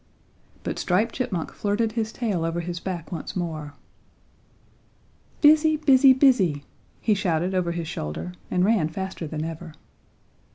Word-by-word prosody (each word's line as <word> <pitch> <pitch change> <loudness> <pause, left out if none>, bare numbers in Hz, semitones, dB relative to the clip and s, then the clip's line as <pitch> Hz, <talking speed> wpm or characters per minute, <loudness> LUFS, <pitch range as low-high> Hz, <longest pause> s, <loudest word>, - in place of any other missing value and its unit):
But - - -3
Striped 205 +6 +1
Chipmunk 185 -10 -3
flirted 215 +2 0
his 220 -1 -2
tail 210 -10 -2
over 165 +1 -1
his 175 0 -5
back 175 -2 -5
once 165 -4 -5
more. 155 -5 -4 1.7
"Busy! 310 +1 +5
busy! 270 -3 +6
busy!" 230 - +3 0.4
he 220 - +2
shouted 180 -2 0
over 180 -2 0
his 170 -1 -4
shoulder 80 - -5 0.2
and 180 0 +2
ran 200 -8 +2
faster 190 -1 -5
than 155 +1 -4
ever. 165 -1 -7
180 Hz, 135 wpm, -24 LUFS, 165-225 Hz, 1.7 s, busy